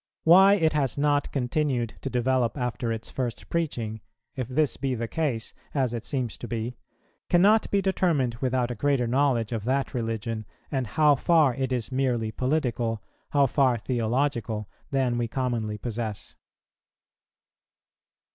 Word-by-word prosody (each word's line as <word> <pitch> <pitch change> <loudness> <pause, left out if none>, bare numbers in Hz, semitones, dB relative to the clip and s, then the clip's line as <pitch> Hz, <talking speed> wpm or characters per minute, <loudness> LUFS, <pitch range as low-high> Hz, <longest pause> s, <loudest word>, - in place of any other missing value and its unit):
Why 190 +4 +7
it 160 -5 +2
has 140 -5 0
not 145 0 +1
continued 125 -3 -1
to 135 - -3
develope 125 0 +1
after 125 -2 -2
its 115 0 -5
first 125 -3 -4
preaching, 115 -10 -2 0.3
if 130 -3 -3
this 140 +3 +1
be 135 -2 -2
the 115 0 -3
case, 135 -6 -2 0.2
as 130 -4 +1
it 115 -2 -4
seems 125 -4 -3
to 120 - -6
be, 115 +1 -3 0.5
cannot 205 +5 +4
be 200 -1 +1
determined 170 -10 +1
without 125 -2 0
a - - -4
greater 140 +1 +1
knowledge 125 -2 +1
of 115 -3 -2
that 135 +2 0
religion, 115 -2 -3 0.2
and 130 -4 -1
how 150 +7 +4
far 155 -2 +3
it 130 +1 -2
is 125 -1 -2
merely 125 -4 0
political, 125 -4 -1 0.3
how 140 -1 +4
far 130 -2 +2
theological, 115 -1 -1 0.2
than 130 -3 +1
we 120 - 0
commonly 115 -4 -2
possess. 110 -1 -5
125 Hz, 145 wpm, -26 LUFS, 115-140 Hz, 0.5 s, Why